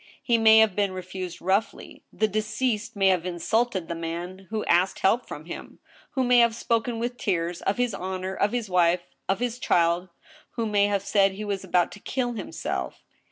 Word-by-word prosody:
He 235 -2 +2
may 220 0 +7
have 220 -4 +5
been 200 -2 0
refused 185 -1 -6
roughly. 195 +4 -1
The 215 - +1
deceased 215 +2 -2
may 195 -1 +4
have 180 -3 +2
insulted 185 +2 -1
the - - -3
man 170 +3 -6
who 220 0 -2
asked 180 +2 +2
help 230 +6 +2
from 150 - -8
him,. 170 - -8
•. - - -37 0.3
who 260 - +1
may 245 -1 +5
have 235 -1 +4
spoken 230 0 -1
with 240 +2 -3
tears, 175 -5 -1
of 195 - 0
his 245 -3 0
honor, 185 +1 -4
of 200 +2 +1
his 240 -2 -2
wife, 175 -1 +3 0.3
of 195 - +1
his 245 0 -2
child 170 -3 +2 0.2
— 310 - -24
who 230 - -1
may 205 -1 +3
have 200 -1 0
said 195 -1 +3
he 210 +2 -6
was 200 -2 -3
about 180 -2 +1
to 210 - -11
kill 245 +3 -2
himself. 65 - -5
200 Hz, 205 wpm, -26 LUFS, 180-225 Hz, 0.3 s, may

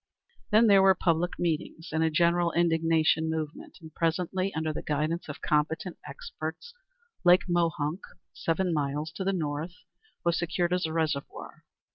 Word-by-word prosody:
Then 220 +2 +5
there 200 -3 +6
were 190 0 +6
public 175 -1 0
meetings 165 0 -3
and 160 +1 +1
a 160 - +3
general 170 +1 +2
indignation 165 -1 +2
movement, 160 -1 -5
and 160 -1 -12
presently, 180 +3 -1
under 160 0 -1
the - - -4
guidance 155 +3 -2
of 145 - -8
competent 160 +3 0
experts, 160 - -7 0.5
Lake 180 +1 +5
Mohunk, 170 -1 0 0.3
seven 175 +2 -1
miles 150 +1 -2
to 190 - -5
the 195 - +1
north, 160 -1 -3 0.5
was 170 0 +2
secured 175 +1 0
as 180 -2 0
a - - -5
reservoir. 155 -3 -3
165 Hz, 150 wpm, -28 LUFS, 155-175 Hz, 0.5 s, there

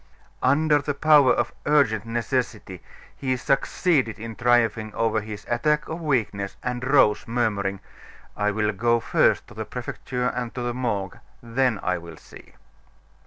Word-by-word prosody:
Under 145 +2 +3
the 145 +1 -3
power 145 -3 +5
of 120 -1 0
urgent 120 -8 +2
necessity, 115 -5 -3 0.3
he 130 -2 -1
succeeded 135 - +1
in 115 0 -7
triumphing 115 -2 +2
over 110 -1 +1
his 105 -1 -8
attack 150 +5 +1
of 165 +2 -5
weakness, 105 -10 -1
and 125 0 -3
rose, 130 -6 +3
murmuring: 100 -5 -1 0.5
"I 105 0 +1
will 105 +1 0
go 115 +3 +1
first - - +2
to - - -12
the - - -5
Prefecture 125 -1 -5
and 125 -1 -3
to 125 - -3
the 120 0 -2
Morgue; 105 -7 -3 0.2
then 120 -2 0
I 90 -1 0
will 85 -1 -11
see." - - -16
120 Hz, 150 wpm, -24 LUFS, 105-130 Hz, 0.5 s, power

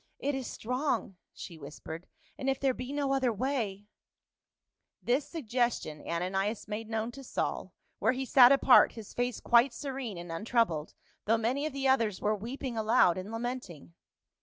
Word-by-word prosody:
"It 285 +1 -1
is 265 -2 -3
strong," 250 -5 -2
she 165 -2 -10
whispered, 160 +3 -9 0.2
" - - -33
and 270 - -1
if 270 - 0
there 270 -2 +2
be 250 +1 -6
no 285 -1 0
other 260 -3 +2
way 220 -4 -2 0.4
— - - -62
" - - -50
This 265 +4 +2
suggestion 240 - -2
Ananias 195 +6 -1
made 215 +1 -5
known 225 +1 -2
to 275 +3 -10
Saul, - - -3 0.3
where - - +3
he 265 +1 -3
sat 255 -1 +7
apart, 275 -2 +6
his 220 -3 -10
face 245 -1 -1
quite 240 +2 +4
serene 265 -8 -5
and 170 0 -7
untroubled, 170 -4 0 0.3
though 225 +2 +3
many 255 +7 0
of 310 - -7
the 275 -1 -1
others 230 -7 +2
were 210 +1 +1
weeping 240 +4 -5
aloud 215 -5 +4
and 185 +3 -6
lamenting. 225 - -5
235 Hz, 175 wpm, -30 LUFS, 205-265 Hz, 0.4 s, sat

